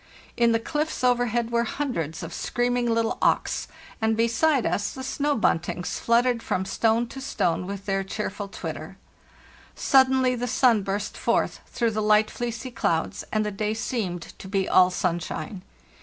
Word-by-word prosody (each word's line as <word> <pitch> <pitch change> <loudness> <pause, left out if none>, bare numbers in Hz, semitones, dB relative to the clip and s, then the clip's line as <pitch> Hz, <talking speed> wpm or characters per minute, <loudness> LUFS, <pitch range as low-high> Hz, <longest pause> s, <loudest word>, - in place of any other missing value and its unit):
In 235 -1 +4
the 230 - +4
cliffs 300 +5 -2
over 245 -1 +3
head 235 0 -1
were 235 0 +2
hundreds 195 - -3
of - - -6
screaming 245 0 0
little 230 0 0
auks, - - +1 0.3
and 220 0 +2
beside 235 +4 +2
us 205 - 0
the 260 - -7
snow 285 +2 0
buntings 180 -4 0
fluttered 235 0 +2
from 190 -3 -1
stone 225 +3 +2
to 270 - -8
stone 180 -9 -1
with 200 0 -6
their 195 -1 0
cheerful 205 0 -4
twitter. - - -7 0.8
Suddenly 260 -1 +4
the 245 0 -2
sun 235 -2 +4
burst 200 +2 -3
forth - - 0
through 235 -2 0
the 215 0 -1
light 215 0 +4
fleecy 240 +1 -4
clouds, 165 -8 -1
and 215 0 +1
the 210 - -2
day 210 +2 -2
seemed 200 -7 -2 0.2
to - - -9
be 195 -1 0
all 185 0 +6
sunshine. 180 +3 -3
225 Hz, 165 wpm, -25 LUFS, 200-245 Hz, 0.8 s, all